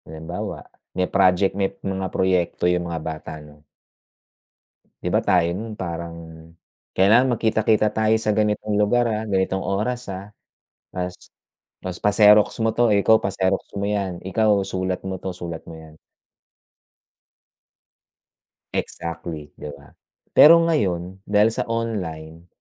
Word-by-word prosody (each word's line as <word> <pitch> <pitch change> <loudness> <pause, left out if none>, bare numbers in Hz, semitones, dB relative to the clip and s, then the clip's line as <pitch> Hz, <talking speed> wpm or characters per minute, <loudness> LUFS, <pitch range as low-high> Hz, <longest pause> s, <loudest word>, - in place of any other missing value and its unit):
Halimbawa, 80 +3 -6 0.3
may 90 - +2
project 95 0 +2
may 95 0 0 0.2
mga 95 -1 -2
proyekto 90 -2 0
yung 90 -1 +1
mga 80 -1 -4
bata, 80 0 -6
'no? 75 -1 -15 1.4
Di - - -1
ba - - +2
tayo 85 -2 +3
nun 110 +1 -6
parang 85 -3 -5 0.8
kailangan 115 +7 +4
magkita-kita 110 -1 +2
tayo 110 +1 +1
sa 110 - +1
ganitong 105 0 0
lugar, 115 +3 +2
ah, 110 0 -2
ganitong 95 -2 -1
oras, 120 +5 -2
ah, 95 +2 -8 0.7
tapos 90 -1 -4 0.6
tapos 90 -1 -7
pa-xerox 105 0 +6 0.2
mo - - +3
'to, 120 -1 +2
ikaw 105 +2 +4
pa-xerox 95 0 0 0.2
mo 100 - -2
yan, 100 -3 -2
ikaw 110 +3 +1 0.2
sulat 95 -1 -2
mo 95 -1 -5
'to, 95 - -4
sulat 85 -2 -6
mo 80 - -9
yan. 80 -1 -14 2.8
Exactly, 85 -2 -5
di - - -7
ba? 70 0 -18 0.4
Pero 165 +2 +8
ngayon 95 - -1
dahil 105 +2 +3
sa - - -3
online, 90 -8 -4
95 Hz, 130 wpm, -22 LUFS, 85-105 Hz, 2.8 s, Pero